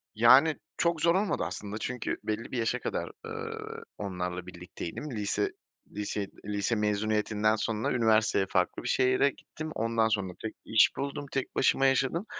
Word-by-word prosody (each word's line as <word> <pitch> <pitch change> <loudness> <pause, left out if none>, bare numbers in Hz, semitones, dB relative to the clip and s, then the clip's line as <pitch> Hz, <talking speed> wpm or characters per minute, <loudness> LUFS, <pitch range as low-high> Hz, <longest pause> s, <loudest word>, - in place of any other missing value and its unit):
Yani, 130 +8 +7 0.2
çok 170 -2 +1
zor 170 +2 +4
olmadı, 200 - +1
aslında. 100 +4 -5
Çünkü 125 +1 -3
belli 110 +2 -3
bir 130 - -2
yaşa 115 +2 0
kadar, - - -3
ııı, - - -6
onlarla 90 -2 -4
birlikteydim. 90 - -7
Lise 105 -3 -1 0.4
liseyi 105 -1 -3 0.2
lise 105 +2 0
mezuniyetinden 105 0 +1
sonra 110 0 -1
üniversiteye 110 -4 +3
farklı 90 -1 0
bir - - -4
şehre 130 +2 +3
gittim. 155 +3 -8
Ondan 115 0 +2
sonra 95 -5 -1
tek 110 - -5
iş 110 - +5
buldum, 140 +1 -3
tek 135 -2 -3
başıma 135 +1 +3
yaşadım, 135 +7 +2
110 Hz, 150 wpm, -29 LUFS, 105-130 Hz, 0.4 s, Yani